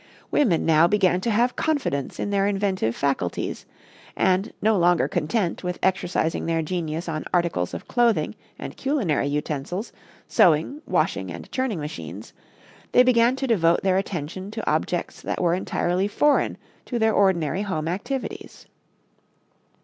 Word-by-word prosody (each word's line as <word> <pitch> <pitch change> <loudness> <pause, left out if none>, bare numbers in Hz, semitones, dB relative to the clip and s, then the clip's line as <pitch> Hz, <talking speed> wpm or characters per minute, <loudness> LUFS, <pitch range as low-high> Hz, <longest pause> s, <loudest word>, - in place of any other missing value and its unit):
Women 210 - +2
now 160 +1 +5
began 185 -2 +2
to 235 - -1
have 235 +3 +2
confidence 280 - -1
in 205 - -2
their 200 0 +2
inventive 195 - 0
faculties, 135 -11 -2 0.5
and, 190 +1 +1
no 220 0 +3
longer 175 -2 +3
content 175 +3 -1
with 180 0 -3
exercising 180 -4 0
their 165 -1 +1
genius 165 0 -3
on 155 -2 -3
articles 170 - 0
of 85 - -8
clothing 240 -2 +2 0.2
and - - -7
culinary 225 - 0
utensils, 150 - -3 0.4
sewing, 170 - +3
washing - - 0
and - - -9
churning 255 - -1
machines, 100 - -7 0.6
they 250 - +7
began 245 0 +4
to 270 - -2
devote 170 -9 +2
their 190 -1 +3
attention 185 0 -4
to 220 +1 -6
objects - - -1
that - - -3
were 170 -2 +2
entirely 180 +1 0
foreign 295 +7 +2 0.3
to 245 - -3
their 220 -1 +2
ordinary 180 -4 +2
home 165 -6 -2
activities. 225 +10 -5
185 Hz, 140 wpm, -24 LUFS, 160-215 Hz, 0.6 s, they